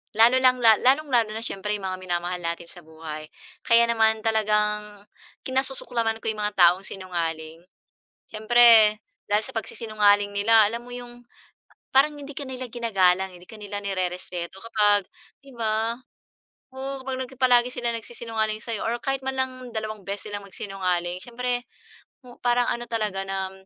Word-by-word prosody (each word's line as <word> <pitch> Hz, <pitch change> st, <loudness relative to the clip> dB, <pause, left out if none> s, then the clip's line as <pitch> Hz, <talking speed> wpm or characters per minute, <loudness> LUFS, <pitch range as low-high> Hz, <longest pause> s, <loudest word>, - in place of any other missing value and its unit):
lalo 230 Hz, +3 st, +6 dB
lang 255 Hz, -1 st, +4 dB
lalong-lalo 245 Hz, 0 st, +4 dB
na 225 Hz, -, -4 dB
siyempre 210 Hz, -1 st, -3 dB
yung 205 Hz, -, -8 dB
mga 185 Hz, 0 st, -4 dB
minamahal 180 Hz, 0 st, -3 dB
natin 170 Hz, 0 st, -4 dB
sa 175 Hz, -, -12 dB
buhay, 155 Hz, -1 st, -8 dB, 0.4 s
kaya 235 Hz, 0 st, +6 dB
naman 220 Hz, -1 st, +2 dB
talagang 210 Hz, -2 st, 0 dB, 0.4 s
kinasusuklaman 255 Hz, -4 st, -1 dB
ko 225 Hz, -, 0 dB
yung 215 Hz, -1 st, -5 dB
mga 210 Hz, -, -7 dB
taong 180 Hz, +1 st, +5 dB
sinungaling. 165 Hz, -4 st, -4 dB, 0.7 s
Siyempre 220 Hz, -1 st, +6 dB, 0.3 s
dahil 210 Hz, +1 st, +2 dB
sa -, -, -8 dB
pagsisinungaling 210 Hz, -2 st, +1 dB
nila 220 Hz, +2 st, +5 dB
alam 230 Hz, +2 st, -4 dB
mo 245 Hz, -, -13 dB
yung 245 Hz, 0 st, -10 dB, 0.7 s
parang 295 Hz, +3 st, +4 dB
hindi 285 Hz, 0 st, -9 dB
ka 285 Hz, -, -5 dB
nila 255 Hz, -1 st, -6 dB
ginagalang 190 Hz, -5 st, +2 dB
eh, -, -, -14 dB
hindi 180 Hz, -, -18 dB
ka 220 Hz, -, -10 dB
nila 205 Hz, -1 st, -5 dB
nirerespeto 180 Hz, -1 st, -4 dB
kapag, 210 Hz, -3 st, +3 dB, 0.4 s
'di 275 Hz, -2 st, -15 dB
ba? 225 Hz, +1 st, 0 dB, 0.8 s
Oo, 270 Hz, 0 st, -5 dB
kapag 260 Hz, -1 st, -4 dB
palagi 245 Hz, -2 st, +5 dB
silang 235 Hz, -2 st, -2 dB
nagsisinungaling 220 Hz, -2 st, -4 dB
sa'yo 230 Hz, -3 st, -4 dB
or 230 Hz, -, 0 dB
kahit 270 Hz, -1 st, 0 dB
man 265 Hz, -, -1 dB
lang 260 Hz, 0 st, 0 dB, 0.2 s
dalawang 215 Hz, -1 st, -4 dB
beses 200 Hz, +1 st, -5 dB
silang 205 Hz, -, -4 dB
magsinungaling, 180 Hz, -3 st, -3 dB
siyempre 245 Hz, 0 st, -2 dB, 0.6 s
o 245 Hz, -, -14 dB
parang 245 Hz, 0 st, +2 dB
ano 240 Hz, 0 st, -2 dB
talaga 210 Hz, -4 st, -2 dB
na 190 Hz, -1 st, -2 dB
215 Hz, 155 wpm, -25 LUFS, 195-240 Hz, 0.8 s, lalo